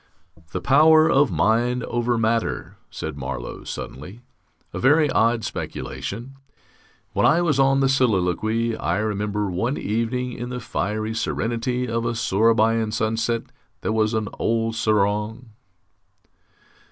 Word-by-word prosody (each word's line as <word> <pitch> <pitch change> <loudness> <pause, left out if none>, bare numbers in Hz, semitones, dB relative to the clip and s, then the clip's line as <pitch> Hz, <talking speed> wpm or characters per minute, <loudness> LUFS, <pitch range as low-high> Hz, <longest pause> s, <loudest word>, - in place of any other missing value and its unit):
"The 95 - -3
power 155 - +6
of 135 0 +4
mind 115 +8 +1
over 120 0 -1
matter," 115 +1 -1
said 80 -2 -6
Marlow, 65 -2 -5
suddenly, 90 - -7 0.5
"a - - -4
very 145 +2 +4
odd 115 0 +2
speculation. 120 +7 -6 0.8
When - - +3
I 175 - +3
was 150 -5 +1
on 135 0 +4
the 135 - +4
Soliloquy, 115 -2 +1
I 85 -2 -1
remember 105 -1 -1
one 115 +10 -1
evening, 120 +3 -2
in 120 +1 -6
the 125 0 -4
fiery 110 -1 -3
serenity 120 +2 -2
of 115 0 -1
a 115 0 -1
Sourabaja 115 +1 +2
sunset, 115 +1 -1 0.4
there 110 - -1
was 110 0 +1
an 110 -1 -1
old 115 0 0
serang...." 105 +2 0
115 Hz, 130 wpm, -23 LUFS, 105-125 Hz, 0.8 s, power